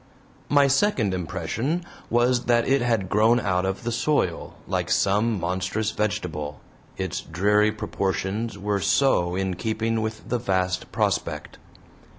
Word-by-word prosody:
My 145 Hz, -1 st, +5 dB
second 140 Hz, -, +2 dB
impression 125 Hz, -, -2 dB, 0.2 s
was 120 Hz, +1 st, +2 dB
that 120 Hz, -1 st, +3 dB
it 135 Hz, 0 st, +3 dB
had 115 Hz, -5 st, +1 dB
grown 110 Hz, +5 st, +4 dB
out 90 Hz, -3 st, 0 dB
of 95 Hz, +5 st, -3 dB
the 120 Hz, -, -2 dB
soil, 120 Hz, -, 0 dB
like -, -, -1 dB
some 105 Hz, +2 st, +2 dB
monstrous 95 Hz, +5 st, -1 dB
vegetable, 80 Hz, -9 st, -3 dB, 0.4 s
its -, -, -3 dB
dreary 105 Hz, +5 st, +2 dB
proportions 100 Hz, +1 st, -2 dB
were 100 Hz, 0 st, -1 dB
so 90 Hz, -9 st, +2 dB
in 95 Hz, 0 st, -1 dB
keeping 110 Hz, +1 st, -1 dB
with 110 Hz, 0 st, -5 dB
the 125 Hz, -, 0 dB
vast 95 Hz, -4 st, -1 dB
prospect. -, -, -2 dB
105 Hz, 135 wpm, -24 LUFS, 95-120 Hz, 0.4 s, My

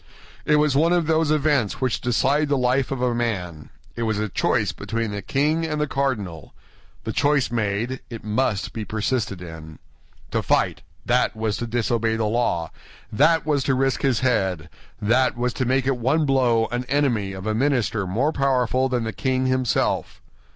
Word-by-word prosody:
It 150 Hz, -, +4 dB
was 150 Hz, -2 st, +2 dB
one 165 Hz, +4 st, +3 dB
of 175 Hz, -2 st, +2 dB
those 160 Hz, 0 st, +2 dB
events 145 Hz, -7 st, +1 dB
which 130 Hz, -3 st, -1 dB
decide 140 Hz, +5 st, +1 dB
the 140 Hz, -, +2 dB
life 130 Hz, +1 st, +1 dB
of 135 Hz, -2 st, -3 dB
a 125 Hz, -1 st, +2 dB
man; 95 Hz, -10 st, -3 dB, 0.3 s
it 115 Hz, -, -5 dB
was 110 Hz, -2 st, 0 dB
a 105 Hz, 0 st, -2 dB
choice -, -, +1 dB
between 115 Hz, -1 st, -3 dB
the 100 Hz, 0 st, -4 dB
king 150 Hz, +9 st, 0 dB
and 155 Hz, -2 st, -2 dB
the 150 Hz, -, +2 dB
cardinal—the 115 Hz, -, -5 dB
choice 145 Hz, -4 st, +2 dB
made, 115 Hz, +3 st, -1 dB
it 115 Hz, -2 st, -8 dB
must 110 Hz, -1 st, -1 dB
be 110 Hz, -, -4 dB
persisted 110 Hz, -3 st, -2 dB
in. 80 Hz, -2 st, -10 dB, 0.5 s
To -, -, 0 dB
fight, -, -, +1 dB, 0.2 s
that 125 Hz, -1 st, +2 dB
was 110 Hz, -2 st, -1 dB
to 120 Hz, -, -4 dB
disobey 115 Hz, -1 st, 0 dB
the 110 Hz, -1 st, -1 dB
law, 105 Hz, -7 st, 0 dB, 0.4 s
that 155 Hz, +7 st, +3 dB
was 145 Hz, -3 st, +1 dB
to 135 Hz, -, +2 dB
risk 135 Hz, 0 st, 0 dB
his 130 Hz, -4 st, +1 dB
head, 95 Hz, -10 st, 0 dB, 0.3 s
that 125 Hz, +5 st, +2 dB
was 125 Hz, 0 st, -1 dB
to 130 Hz, -, -1 dB
make 130 Hz, +1 st, +1 dB
at 135 Hz, -2 st, 0 dB
one 145 Hz, +6 st, +2 dB
blow 125 Hz, -5 st, +3 dB
an 120 Hz, +1 st, -1 dB
enemy 120 Hz, -9 st, 0 dB
of 95 Hz, +1 st, -8 dB
a 110 Hz, -, 0 dB
minister 115 Hz, -5 st, 0 dB
more 125 Hz, +12 st, +1 dB
powerful 130 Hz, -1 st, +1 dB
than 125 Hz, -2 st, 0 dB
the 110 Hz, -1 st, -3 dB
king 130 Hz, 0 st, 0 dB
himself. 130 Hz, -2 st, 0 dB
125 Hz, 180 wpm, -23 LUFS, 110-135 Hz, 0.5 s, It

